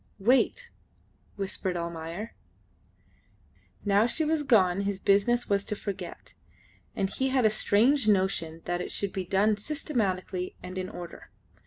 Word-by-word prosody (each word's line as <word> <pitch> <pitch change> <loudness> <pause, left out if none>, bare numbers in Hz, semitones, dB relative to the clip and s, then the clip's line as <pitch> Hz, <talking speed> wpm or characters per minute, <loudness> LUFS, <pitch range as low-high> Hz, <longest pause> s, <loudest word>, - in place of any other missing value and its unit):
"Wait," 260 - +2 0.6
whispered 190 -2 -2
Almayer. 170 +5 -5 1.5
Now 205 +2 +4
she 315 +5 0
was 315 0 +1
gone 200 -9 +3
his 200 -1 -2
business 205 +6 +2
was 200 -1 +2
to 210 - -1
forget, 195 -4 -7 0.6
and 195 - 0
he 265 +7 -1
had 260 -3 +2
a 215 - +5
strange 225 +5 +3
notion 185 -5 +1
that 175 0 -1
it - - -5
should 200 -1 -1
be 190 -1 -3
done 205 +4 +2
systematically 200 - -2
and 185 +1 -5
in 185 0 -4
order. 175 -1 -9
200 Hz, 140 wpm, -28 LUFS, 185-230 Hz, 1.5 s, a